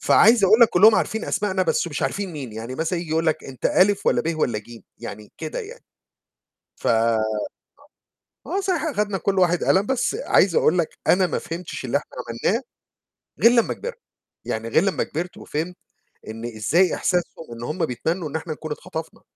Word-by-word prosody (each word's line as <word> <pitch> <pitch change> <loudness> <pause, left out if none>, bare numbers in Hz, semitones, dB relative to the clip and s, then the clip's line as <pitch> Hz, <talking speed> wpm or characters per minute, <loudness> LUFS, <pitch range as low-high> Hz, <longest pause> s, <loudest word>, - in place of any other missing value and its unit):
فعايز 225 -1 +5
أقول 220 +5 +6
لك 235 - +8
كلّهم 215 +5 +6
عارفين 220 - -1
أسمائنا، 190 -2 0
بس 475 0 0
مش - - -5
عارفين 200 -3 -2
مين، 135 -8 -7
يعني 115 +3 -6
مثلًا 165 +4 -1
ييجي 170 -2 -7
يقول 160 +1 +1
لك 160 - 0
أنت 130 -2 -8
ألِف، 200 +2 +3
والّا - - +3
به، 165 0 -2
والّا 120 -8 0
جيم؟ 115 +2 -13
يعني 105 +1 -9
كده - - -5
يعني. 475 +2 -9 0.9
ف - - -5
آه، 110 -2 +2 1.2
صحيح، 360 -6 0
أخدنا 210 -10 -1
كلّ 195 +2 0
واحد 175 -1 +2
قلم، 195 +2 +3
بس 265 - 0
عايز 200 - +3
أقول 175 +4 +3
لك 170 - -1
أنا 185 0 +4
ما - - -2
فهمتش 165 -4 -6
اللي 125 - +1
إحنا 145 - -10 0.4
عملناه 230 +6 +1 0.8
غير 230 - +8
لمّا 235 -2 +2
كبرت، 475 0 -7 0.5
يعني 110 +1 -3
غير 160 +8 +3
لمّا 195 -1 0
كبرت، 175 +4 -5
وفهمت 165 +4 -4 0.5
إن 115 +2 -7
إزاي 120 - +2
إحساسهم 175 -3 -1
إن 115 0 -8
هم 160 +6 -1
بيتمنوا 160 +6 -2
إن 150 - -8
إحنا 160 0 -3
نكون 155 0 -8
اتخطفنا، 160 +2 -6
170 Hz, 185 wpm, -23 LUFS, 135-200 Hz, 1.2 s, لك